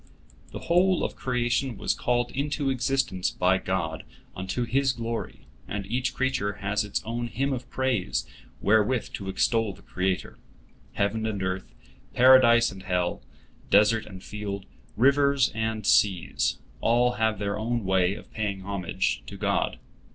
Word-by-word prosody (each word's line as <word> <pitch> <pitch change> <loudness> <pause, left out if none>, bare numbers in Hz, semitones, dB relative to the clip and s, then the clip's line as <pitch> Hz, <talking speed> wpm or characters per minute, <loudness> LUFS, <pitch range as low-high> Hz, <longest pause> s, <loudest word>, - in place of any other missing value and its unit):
" - - -27
The - - -7
whole 180 +1 +3
of - - -2
creation 125 0 -1
was - - 0
called 120 0 0
into 145 0 -1
existence 125 -7 0
by 95 +1 +2
God 85 -5 -2 0.3
unto 95 +7 -2
His 130 +3 +1
glory, 115 -1 -5 0.3
and 100 -1 -4
each 125 +3 -2
creature 130 -6 0
has 105 +1 -1
its 105 - -3
own 120 +1 -3
hymn 135 +4 -1
of 125 -1 -6
praise 95 - -1 0.4
wherewith 110 +4 +2
to 95 -1 -5
extol 110 +1 +1
the - - -18
Creator. 95 0 -2 0.5
Heaven 110 +2 0
and 100 -3 -3
earth, 95 0 -4 0.4
Paradise 120 -2 +6
and 95 -1 -10
hell, 90 -2 -1 0.5
desert 105 +2 +4
and 95 -2 -10
field, 100 -2 -5 0.3
rivers 140 +1 +4
and 110 -1 -2
seas—all 115 +5 +2
have 110 -1 +1
their 100 +1 -2
own 115 +1 -1
way 95 0 +2
of - - -13
paying 100 -3 -2
homage 95 -3 -2
to - - -8
God. - - 0
110 Hz, 145 wpm, -26 LUFS, 95-125 Hz, 0.5 s, Paradise